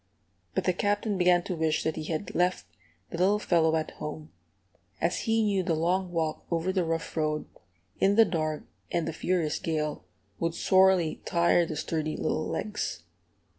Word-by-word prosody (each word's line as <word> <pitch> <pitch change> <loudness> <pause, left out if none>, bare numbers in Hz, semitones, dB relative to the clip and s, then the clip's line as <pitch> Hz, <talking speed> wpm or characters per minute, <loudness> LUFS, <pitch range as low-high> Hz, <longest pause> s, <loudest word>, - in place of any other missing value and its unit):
But - - +1
the 185 - +2
Captain 205 +3 0
began 180 -1 +4
to 180 - -3
wish 160 -1 0
that 160 - -1
he 155 - -5
had 160 +4 -3
left 180 - +1 0.5
the 170 - -5
little 195 +3 +4
fellow 165 -5 +2
at 160 -1 -1
home, 150 0 -7 0.7
as 175 - +1
he 225 0 +3
knew 200 -3 +2
the 170 -2 0
long 180 +3 0
walk 160 -2 -2
over 170 +2 0
the 185 -2 +1
rough 165 0 -3
road, 155 -1 0 0.5
in 195 +1 +4
the 225 +1 +7
dark 155 -4 -2 0.3
and 170 -2 0
the 165 - -3
furious 165 -2 0
gale, 150 - -2 0.4
would 165 0 -1
sorely 185 -4 +3
tire 170 0 +3
the 155 - -4
sturdy 155 0 -2
little 155 - -1
legs. 210 - -3
170 Hz, 170 wpm, -28 LUFS, 155-185 Hz, 0.7 s, the